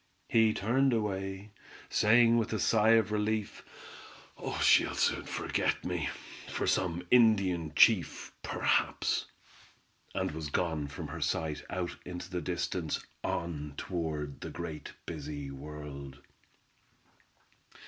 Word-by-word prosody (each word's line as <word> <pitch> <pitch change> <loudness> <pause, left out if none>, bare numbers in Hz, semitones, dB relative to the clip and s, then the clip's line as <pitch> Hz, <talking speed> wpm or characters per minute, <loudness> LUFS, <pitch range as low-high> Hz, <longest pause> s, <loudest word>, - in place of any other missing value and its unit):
He 110 -1 +5
turned 125 +6 +2
away, 95 -2 -2 0.4
saying 115 +2 +5
with 115 0 -1
a 110 - 0
sigh 110 0 +4
of 110 -1 +3
relief: 105 0 -1 1.0
"She'll - - +5
soon - - +1
forget - - -1
me, 85 -5 -1 0.4
for - - -2
some 90 -1 0
Indian 100 -9 +4
Chief, 105 0 +4
perhaps," - - +1 0.9
and - - 0
was 75 -1 -5
gone 80 -2 -1
from 70 - -7
her - - -6
sight 80 -2 -1
out 90 -1 -3
into 90 0 -7
the 90 -1 -2
distance, 85 -2 -2 0.2
on 75 -4 -3
toward 80 -5 -3
the - - -5
great 75 -1 -6
busy 75 -3 -5
world. 70 -1 -8
90 Hz, 115 wpm, -31 LUFS, 75-105 Hz, 1.0 s, He